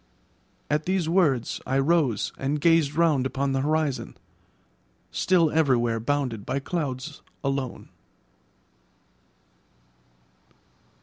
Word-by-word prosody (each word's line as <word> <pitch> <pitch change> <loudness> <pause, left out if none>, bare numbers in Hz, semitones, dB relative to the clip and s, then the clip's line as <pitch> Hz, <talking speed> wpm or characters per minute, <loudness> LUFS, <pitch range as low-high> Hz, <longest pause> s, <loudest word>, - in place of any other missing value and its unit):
At 150 +1 0
these 185 -3 0
words 160 -9 +1
I 135 - +1
rose 135 -5 +1
and 140 +3 -1
gazed 160 -2 +3
round 155 -6 +3
upon 135 +1 -2
the 135 0 0
horizon, 150 -1 -1 0.9
still 170 -4 +2
everywhere 120 -7 +2
bounded 125 -3 -1
by 130 +5 -2
clouds 140 -1 -4 0.2
alone. 135 -2 -3
140 Hz, 90 wpm, -25 LUFS, 130-160 Hz, 0.9 s, gazed